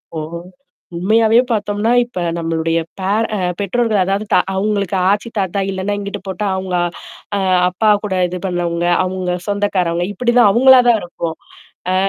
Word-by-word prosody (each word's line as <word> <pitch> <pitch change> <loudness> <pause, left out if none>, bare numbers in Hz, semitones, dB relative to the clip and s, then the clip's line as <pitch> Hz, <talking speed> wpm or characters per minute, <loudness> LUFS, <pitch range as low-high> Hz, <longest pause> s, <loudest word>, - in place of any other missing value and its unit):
ஓ! - - -3 0.8
உண்மையாவே 220 +5 +3
பார்த்தோம்ன்னா, 210 +1 0
இப்ப 240 -6 -7 0.2
நம்மளுடைய 165 0 -1 0.2
பேர 205 +4 0
அ - - -3 0.2
பெற்றோர்கள் 215 0 0
அதாவது 195 +3 -1
தா - - +6
அவுங்களுக்கு 200 -1 -1
ஆச்சி, 205 +3 0
தாத்தா 195 +1 -1
இல்லன்னா, 195 +2 -2
இங்கிட்டு 200 0 -6
போட்டா 205 +2 -3
அவுங்க 190 -1 -3 0.6
அ - - 0 0.3
அப்பா 210 +4 +1
கூட 200 -2 -3
இது 180 +1 -6
பண்ணவங்க, 175 -1 -2 0.2
அங்க 185 -1 -2
சொந்தக்காரவுங்க, 185 -4 0
இப்பிடிதான் 240 0 +3
அவுங்களா 260 +3 +6
தான் 225 -2 +4
இருக்கும். 170 -2 -5 0.6
அ. - - +1
195 Hz, 145 wpm, -17 LUFS, 180-215 Hz, 0.8 s, தா